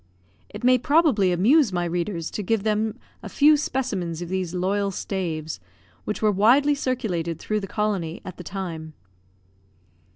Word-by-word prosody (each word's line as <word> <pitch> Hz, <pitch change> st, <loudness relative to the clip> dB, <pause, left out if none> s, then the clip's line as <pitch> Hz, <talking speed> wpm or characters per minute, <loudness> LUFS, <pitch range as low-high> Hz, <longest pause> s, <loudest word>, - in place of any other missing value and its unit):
It 210 Hz, -, -9 dB
may 255 Hz, 0 st, +5 dB
probably 275 Hz, -, +3 dB
amuse 225 Hz, -, +4 dB
my 175 Hz, -1 st, -1 dB
readers, 170 Hz, 0 st, -3 dB
to -, -, -3 dB
give 210 Hz, +1 st, 0 dB
them 215 Hz, +1 st, 0 dB, 0.2 s
a -, -, -8 dB
few 300 Hz, +1 st, +5 dB
specimens 220 Hz, -, -2 dB
of 170 Hz, -, -8 dB
these 185 Hz, -2 st, -2 dB
loyal 200 Hz, +3 st, 0 dB
staves, 165 Hz, -, -4 dB, 0.5 s
which 210 Hz, -, -3 dB
were 215 Hz, -, +4 dB
widely 245 Hz, +9 st, +4 dB
circulated 200 Hz, -, -2 dB
through 215 Hz, +5 st, -2 dB
the 195 Hz, -, -6 dB
colony 195 Hz, -6 st, -2 dB
at 185 Hz, -, -8 dB
the 180 Hz, -, -8 dB
time. 165 Hz, -4 st, -6 dB
200 Hz, 155 wpm, -24 LUFS, 175-225 Hz, 0.5 s, may